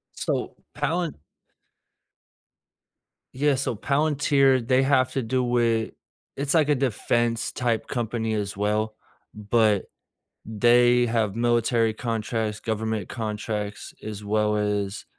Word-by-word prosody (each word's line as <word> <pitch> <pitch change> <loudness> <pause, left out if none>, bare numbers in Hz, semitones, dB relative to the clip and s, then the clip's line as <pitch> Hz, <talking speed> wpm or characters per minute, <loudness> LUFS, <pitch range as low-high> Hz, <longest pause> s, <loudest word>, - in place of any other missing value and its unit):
So, - - -2 0.2
Palant 170 -2 -1 2.2
yeah, 140 +1 +2
so 130 -3 -2
Palantir, 140 -1 +2
they 130 +2 +3
have 130 -2 +3
to 135 - 0
do 125 +1 0
it 115 -2 +1 0.4
it's 140 +1 -1
like 160 -3 +4
a 150 - +3
defense-type 120 -1 0
company 115 -2 -2
as 100 -2 -3
well, 105 +1 0 0.4
but, 105 -1 +2 0.6
they 120 +2 +4
have 110 -3 0
military 115 -1 +2
contracts, 110 -1 -2
government 110 -2 -2
contracts, 105 -2 -4
as 105 -1 -7
well 105 0 +1
as 105 -1 -2
115 Hz, 105 wpm, -25 LUFS, 105-130 Hz, 2.2 s, like